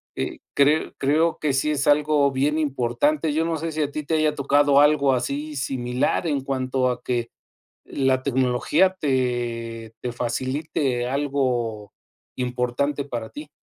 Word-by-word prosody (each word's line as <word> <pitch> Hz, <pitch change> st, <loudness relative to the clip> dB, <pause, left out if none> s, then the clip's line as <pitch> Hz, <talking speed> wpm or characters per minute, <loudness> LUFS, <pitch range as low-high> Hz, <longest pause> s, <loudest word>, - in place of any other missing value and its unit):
eh, -, -, -4 dB, 0.2 s
cre 145 Hz, +3 st, +3 dB
creo 155 Hz, +4 st, +2 dB
que 150 Hz, -3 st, 0 dB
sí 135 Hz, +3 st, +1 dB
es 140 Hz, -2 st, -1 dB
algo 145 Hz, -1 st, +3 dB
bien 145 Hz, +4 st, +1 dB
importante. 145 Hz, +2 st, 0 dB
Yo 160 Hz, +2 st, +1 dB
no 165 Hz, -1 st, -1 dB
sé 165 Hz, +1 st, -4 dB
si 155 Hz, -, -1 dB
a 145 Hz, -, -3 dB
ti 150 Hz, -, -4 dB
te 160 Hz, -, -2 dB
haya 155 Hz, -1 st, +2 dB
tocado 140 Hz, 0 st, +3 dB
algo 145 Hz, -2 st, +4 dB
así, 140 Hz, +4 st, -3 dB
similar, 130 Hz, +4 st, -1 dB
en 145 Hz, -3 st, 0 dB
cuanto 130 Hz, -1 st, -1 dB
a 125 Hz, -, -5 dB
que 120 Hz, -2 st, -2 dB, 0.6 s
la 130 Hz, -1 st, 0 dB
tecnología 130 Hz, +8 st, +2 dB
te 120 Hz, -4 st, -2 dB
te 125 Hz, -, -3 dB
facilite 130 Hz, +1 st, -2 dB
algo 125 Hz, -7 st, -1 dB, 0.4 s
importante 125 Hz, +3 st, -1 dB
para 120 Hz, -5 st, -5 dB
ti. 150 Hz, 0 st, -9 dB
140 Hz, 150 wpm, -23 LUFS, 125-150 Hz, 0.6 s, algo